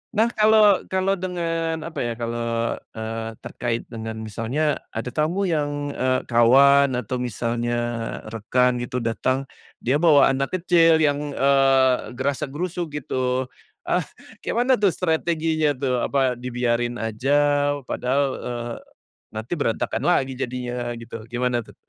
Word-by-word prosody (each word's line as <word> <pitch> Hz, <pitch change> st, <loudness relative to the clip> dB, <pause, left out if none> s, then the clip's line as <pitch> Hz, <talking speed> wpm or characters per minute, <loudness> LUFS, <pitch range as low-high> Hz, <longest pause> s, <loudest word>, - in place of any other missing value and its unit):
Nah, 225 Hz, +2 st, +3 dB
kalau 215 Hz, -2 st, +5 dB
kalau 190 Hz, +1 st, +1 dB
dengan 165 Hz, -3 st, -2 dB
apa 165 Hz, 0 st, -6 dB
ya, 120 Hz, -1 st, -1 dB
kalau, 115 Hz, 0 st, -2 dB, 0.2 s
eee, 110 Hz, 0 st, -4 dB
terkait 120 Hz, -1 st, -3 dB
dengan 110 Hz, -1 st, -5 dB
misalnya 130 Hz, +9 st, -1 dB, 0.2 s
ada 115 Hz, +2 st, -3 dB
tamu 165 Hz, +6 st, 0 dB
yang, 145 Hz, -2 st, -1 dB
eee, 130 Hz, 0 st, +1 dB
kawan 135 Hz, +4 st, +5 dB
atau 125 Hz, +1 st, -3 dB
misalnya 120 Hz, 0 st, -2 dB, 0.6 s
rekan 125 Hz, +3 st, +1 dB
gitu, 120 Hz, +1 st, -4 dB
datang, 130 Hz, +4 st, 0 dB, 0.4 s
dia 130 Hz, +4 st, +2 dB
bawa 155 Hz, -5 st, +6 dB
anak 135 Hz, +5 st, -2 dB
kecil 165 Hz, -2 st, +4 dB
yang, 145 Hz, 0 st, 0 dB
eee, 135 Hz, -2 st, +3 dB
grasak-grusuk 145 Hz, +6 st, -2 dB, 0.2 s
gitu, 130 Hz, 0 st, -1 dB, 0.4 s
ah, -, -, +1 dB, 0.4 s
kek -, -, -3 dB
mana 245 Hz, 0 st, +3 dB
tuh 205 Hz, -, +4 dB
strateginya 160 Hz, -3 st, 0 dB
tuh? 130 Hz, -2 st, -1 dB
Apa 130 Hz, -3 st, +1 dB
dibiarin 120 Hz, -1 st, -1 dB
aja 145 Hz, +5 st, +1 dB
padahal, 130 Hz, +3 st, 0 dB, 0.2 s
eee, 120 Hz, -1 st, -5 dB, 0.6 s
nanti 110 Hz, +9 st, -4 dB
berantakan 115 Hz, -1 st, -1 dB
lagi 135 Hz, -6 st, +2 dB
jadinya 125 Hz, -1 st, -3 dB
gitu, 115 Hz, -1 st, -9 dB
gimana 120 Hz, 0 st, 0 dB
tuh? 115 Hz, -, -11 dB
130 Hz, 130 wpm, -23 LUFS, 120-155 Hz, 0.6 s, bawa